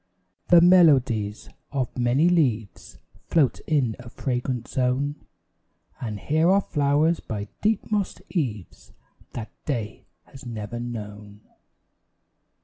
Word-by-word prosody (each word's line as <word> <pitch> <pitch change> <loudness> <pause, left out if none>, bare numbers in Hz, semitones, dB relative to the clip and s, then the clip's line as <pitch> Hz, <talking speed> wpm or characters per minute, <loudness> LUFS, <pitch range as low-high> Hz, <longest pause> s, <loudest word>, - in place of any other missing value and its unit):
The 175 -1 +7
melodies 135 - +4 0.2
of 130 -3 -2
many 125 +6 +2
leaves 120 - 0 0.3
Float 150 -6 +2
in 135 -8 +1
a 120 -1 -10
fragrant 125 -1 -3
zone; 130 +3 0 0.9
And 110 -4 -5
here 160 - +2
are 195 +1 +5
flowers 150 +1 +1
by 105 -2 -6
deep 215 +1 0
mossed 205 -3 -1
eaves 115 - -4 0.4
That 115 -2 -6
day 115 -8 -4 0.2
has 135 - -14
never 115 -1 -6
known. 105 -3 -7
125 Hz, 110 wpm, -24 LUFS, 110-155 Hz, 0.9 s, The